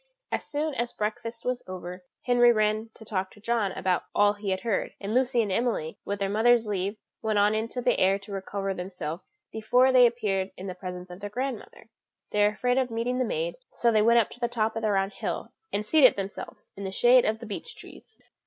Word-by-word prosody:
As - - -1
soon 300 +1 -2
as 240 -2 -2
breakfast 230 +2 -4
was 250 0 -1
over, 180 0 -7 0.2
Henry 245 -1 +5
ran 215 0 +1
to 220 - -13
talk 190 -3 -2
to 205 - -18
John 220 -2 0
about 185 -1 0
all 205 0 +5
that 205 - -17
he 200 -2 -1
heard: 195 +2 -2
and 200 +1 -4
Lucy 250 -1 +3
and 205 - -3
Emily, 210 -7 -1
with 200 - -2
their 200 -1 -1
mother's 225 +3 +4
leave, 200 0 -2 0.2
went 215 -1 0
out 205 +1 +4
into 230 +3 -2
the 245 - +2
air 195 +1 +4
to 200 +1 -12
recover 195 0 -3
themselves 180 -2 -6 0.2
before 250 +4 +3
they 250 -1 +7
appeared 200 -5 -1
in 185 - -7
the 185 - -4
presence 180 0 -7
of 180 - -9
their 205 0 -5
grandmother. 245 -1 -5 0.4
They 210 - +1
were 205 - +6
afraid 245 +5 +1
of 255 -1 0
meeting 235 +2 -1
the 255 - +2
maid, 170 -4 -2 0.2
so 235 - +3
they 215 -1 +4
went 230 +2 +5
up 230 - +3
to - - -12
the 240 - +1
top 225 -2 -1
of 225 - -2
the 215 - +1
round 195 0 +1
hill, - - -4 0.2
and 210 - -1
seated 275 +1 +6
themselves 195 0 -7
in 200 - -7
the 190 - -3
shade 245 +5 +5
of 215 +1 +1
the 230 - -9
beech 230 - -6
trees. 440 - -12
215 Hz, 225 wpm, -27 LUFS, 195-240 Hz, 0.4 s, they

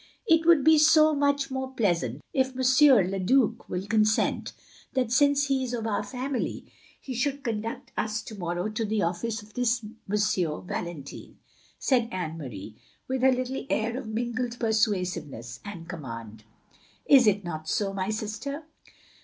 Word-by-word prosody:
"It 325 -5 +3
would 335 -5 +6
be 315 +1 +6
so 310 0 +6
much 285 -1 +1
more 265 0 -3
pleasant, 170 - 0
if 260 -1 0
M. 260 -6 +5
le 195 - -2
Due 240 +6 +2
will 180 +1 -3
consent, 215 0 +1 0.4
that, 255 -3 0
since 285 +2 +4
he 270 -2 0
is 250 -1 -2
of 225 -2 -4
our 215 -2 0
family, 255 +4 -3 0.3
he 265 - -7
should 275 +3 -1
conduct 225 -1 -4
us 215 +1 -2
to - - -9
morrow 175 -1 -3
to 215 +2 -3
the 215 -1 0
oflfice 210 +6 -2
of 210 +1 -18
this 245 0 +1
M. 215 +2 -11 0.7
Valentine," 170 -7 -6 0.4
said 240 -4 +1
Anne 175 -4 -3
Marie, 110 -6 -8 0.3
with 260 0 -1
her 265 0 +6
little 255 +1 -2
air 225 +2 0
of 255 - -5
mingled 240 +2 -3
persuasiveness 180 - -1
and 175 -5 -8
command. 115 - -8 0.6
"Is 260 -5 +6
it 205 -1 +3
not 155 -2 -5
so, 200 -3 0
my 190 0 -2
sister?" 220 +8 -4
225 Hz, 160 wpm, -27 LUFS, 185-260 Hz, 0.7 s, would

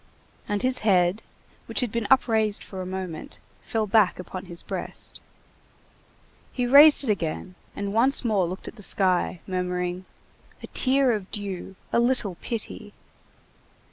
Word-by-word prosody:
And 205 +2 -1
his 255 0 +1
head, 190 -1 +2 0.5
which - - +1
had 245 -4 -1
been 230 -2 -2
upraised 220 -5 +3
for 190 -2 -7
a 185 - -6
moment, 185 -4 -4 0.2
fell 220 -1 -2
back 210 -2 +3
upon 185 +1 -7
his 175 -2 -5
breast. - - -4 1.3
He 250 - -1
raised 285 +4 +8
it 235 - +1
again, 180 -1 -3 0.2
and 200 0 -4
once 250 +4 +4
more 200 -6 +2
looked 185 +2 -7
at - - -9
the - - -11
sky, 185 -3 +1
murmuring:— 180 -1 -3 0.6
"A - - -6
tear 265 0 +3
of 205 -4 -3
dew! 195 -2 -5 0.2
A - - +4
little 240 -5 +1
pity!" 215 -2 -4
205 Hz, 145 wpm, -25 LUFS, 185-235 Hz, 1.3 s, raised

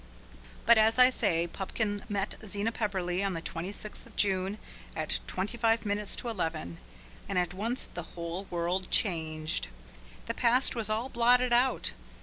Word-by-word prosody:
But, 235 -1 +7
as 220 +2 +4
I 250 0 +8
say, 170 -8 +1
Pupkin 205 +3 -3
met 200 -1 -1
Zena 205 +2 -1
Pepperleigh 190 -4 -1
on 195 -2 0
the 165 - -3
26th 195 +5 -5
of - - -18
June, 195 0 +1 0.4
at - - +1
twenty 195 +6 -3
five 225 -1 +3
minutes 205 0 0
to 245 - -3
eleven. 160 - -3 0.5
And 185 - -1
at 180 -1 +1
once 225 +7 0
the 175 - -6 0.2
whole 170 +3 -4
world 175 +1 -1
changed. 160 -5 0 0.6
The - - -2
past 250 +2 +2
was 225 -3 -1
all 220 +4 0
blotted 245 0 +4
out. 250 +2 +2
205 Hz, 155 wpm, -30 LUFS, 180-230 Hz, 0.6 s, I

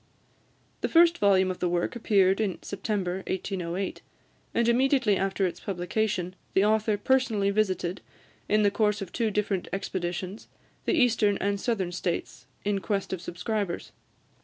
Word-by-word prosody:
The - - 0
first 340 0 +5
volume 190 -2 +4
of 180 - -7
the 180 - 0
work 175 +5 -1
appeared 195 -3 +3
in 200 -4 -1
September 195 -3 -2
1808, 185 0 -3 0.5
and 235 0 +3
immediately 255 -2 +3
after 195 0 0
its 175 -1 -3
publication 185 0 -2 0.2
the 195 - +5
author 215 0 +2
personally 220 -3 +2
visited, 190 -3 0 0.5
in 210 0 +4
the 205 - +4
course 210 -1 +1
of 185 - -10
two 230 -2 0
different 205 -3 -1
expeditions, 185 0 -4 0.4
the - - +2
Eastern 230 -7 +3
and 200 0 -1
Southern 195 -7 -1
States, 175 -1 -3 0.2
in 205 -1 +1
quest 195 -1 -2
of 185 - -4
subscribers. 180 +1 -3
200 Hz, 145 wpm, -27 LUFS, 185-215 Hz, 0.5 s, first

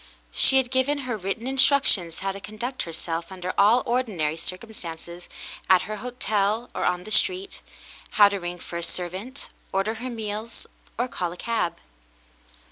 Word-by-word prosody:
She 265 - +5
had 255 -2 +2
given 260 +3 +2
her 245 -2 -1
written 200 +3 -3
instructions 265 - +3
how 195 - +2
to 195 - -7
conduct 215 +6 -4
herself 165 +1 -3
under 180 -1 -4
all 215 +5 +5
ordinary 205 -12 0
circumstances, 175 -2 -6 0.4
at 185 -1 +7
her 215 +1 -4
hotel 220 -1 0
or - - -1
on 180 0 +1
the 215 - -8
street 375 - +2 0.2
— - - -19
how 205 -1 +10
to 200 -1 -2
ring 175 0 -4
for 170 0 -7
a - - -3
servant, 185 +11 -4 0.2
order 195 +3 +1
her 235 +3 -5
meals, 220 -1 -5 0.3
or 245 +2 +1
call 175 -8 -2
a 175 - -9
cab. 175 -7 -1
210 Hz, 165 wpm, -26 LUFS, 180-245 Hz, 0.4 s, how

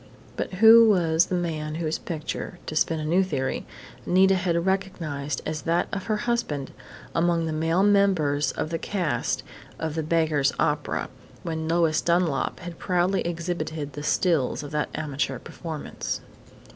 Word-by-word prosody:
But - - -4
who 225 +3 +8
was 170 -4 +3
the 185 - -1
man 155 -3 -2
whose 160 -1 -2
picture 165 +1 -5
to 155 - -5
spin 160 +1 +1
a 155 - -3
new 175 +5 +3
theory 135 -8 -2 0.4
Nita 190 +2 +4
had 175 -2 0
recognized 165 -7 -2
as 155 -1 -3
that 170 +1 +1
of 195 - -3
her 215 -1 0
husband 195 - -1 0.4
among 170 -1 +2
the 160 - -2
male 165 +4 +1
members 180 -9 +3
of 155 - -3
the 165 - -1
cast 180 -6 -1 0.3
of 160 -2 -3
"The 160 - -1
Beggar's 155 -3 +2
Opera," 150 -1 0 0.4
when 160 -2 -3
Lois 165 -1 +2
Dunlap 170 -4 +1
had 175 -1 -8
proudly 180 +1 +1
exhibited 160 -3 -3
the 145 - -6
"stills" 150 -3 +1
of 145 - -8
that 150 -1 -1
amateur 145 -3 -2
performance? 160 +4 -5
165 Hz, 155 wpm, -25 LUFS, 155-180 Hz, 0.4 s, who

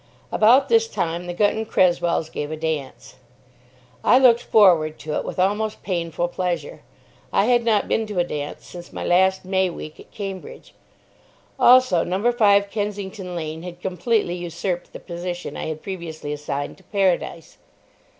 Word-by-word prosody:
About 245 +6 +5
this 455 -1 +3
time 170 - -3
the 175 - -3
Gunton 215 +3 +1
Cresswells 175 -4 +1
gave 150 - -4
a 155 - -5
dance. 155 -4 -4 0.9
I 250 - +6
looked 245 -3 +5
forward 170 -10 +4
to 150 +1 -5
it - - -1
with - - -6
almost 210 +3 0
painful 170 -2 -2
pleasure. 180 - -3 0.5
I 200 - +3
had 240 0 +3
not 220 -3 +2
been 225 -1 0
to 210 -3 -6
a 175 - +4
dance 150 -4 -6
since 175 -1 -11
my - - -6
last 190 +2 +3
May 190 0 +1
week 155 -2 -9
at - - -14
Cambridge. 200 - -8 0.9
Also 250 -9 +6
No. 195 +7 +1
5, 200 -4 +3
Kensington 200 -3 -4
Lane 160 -1 -5
had 175 0 -9
completely 185 +2 0
usurped 175 +1 -4
the - - -9
position 175 0 -6
I - - -4
had 155 -1 -5
previously 165 -6 -6
assigned 145 -1 -4
to 190 - -21
Paradise. 185 -5 -1
185 Hz, 160 wpm, -22 LUFS, 170-210 Hz, 0.9 s, I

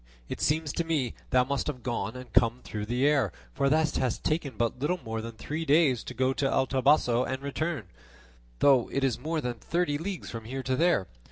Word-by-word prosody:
It - - -5
seems 150 -1 +1
to 170 - 0
me 150 -8 -1 0.2
thou 125 0 +4
must 140 +1 -2
have 130 -5 -4
gone 115 -2 -2
and 125 0 -10
come 120 +2 +3
through 105 -1 -5
the 125 +4 +1
air, 145 -2 +3 0.2
for 140 -1 +1
thou 155 +2 +4
hast 130 -5 -1
taken 150 -7 -1
but 120 +2 0
little 170 +7 0
more 110 0 -3
than 115 +1 -7
three 150 +8 -4
days 145 -5 +3
to 125 - -7
go 130 +2 +2
to 135 0 0
El 130 - +3
Toboso 130 -2 +3
and 130 +1 -4
return, 145 -1 -2 0.7
though 130 - +4
it 135 - -1
is 135 -2 +1
more 160 0 -2
than 120 -3 -4
thirty 160 -1 0
leagues 185 +2 -5
from 115 -2 -7
here 130 +3 -4
to 130 0 0
there. 165 - +3
135 Hz, 215 wpm, -28 LUFS, 125-150 Hz, 0.7 s, thou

